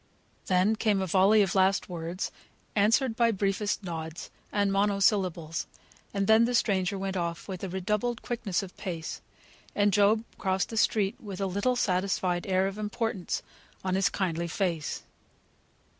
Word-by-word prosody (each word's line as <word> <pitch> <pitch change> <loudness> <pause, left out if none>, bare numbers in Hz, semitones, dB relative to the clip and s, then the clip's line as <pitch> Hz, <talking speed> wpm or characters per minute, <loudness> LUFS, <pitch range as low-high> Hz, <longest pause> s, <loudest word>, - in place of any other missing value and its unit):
Then 185 +4 +3
came 215 -2 +1
a 190 - 0
volley 195 +4 +5
of 190 - -1
last 190 0 +3
words, 175 +1 -4 0.4
answered 225 +4 +3
by 235 0 +3
briefest 200 0 0
nods, 160 -2 -6 0.2
and 200 -1 +1
monosyllables; 195 -5 +1 0.4
and 200 -1 0
then 220 +3 +6
the 245 +1 0
stranger 195 -4 +1
went 195 0 -3
off 170 -2 -3
with 190 -2 -6
redoubled 210 +6 -1
quickness 205 -7 -2
of 185 - -10
pace, 170 -5 -5 0.5
and 205 -1 +3
Job 210 +2 +4 0.2
crossed 190 -1 0
the 225 - -6
street 210 -2 +1
with 200 -3 -7
a 195 - 0
little 200 +7 0
satisfied 185 -4 0
air 190 0 +2
of 195 +2 -3
importance 215 -2 -2 0.4
on 185 -1 -1
his 190 0 +3
kindly 170 -3 -1
face. 170 -3 -2
195 Hz, 150 wpm, -28 LUFS, 185-210 Hz, 0.5 s, then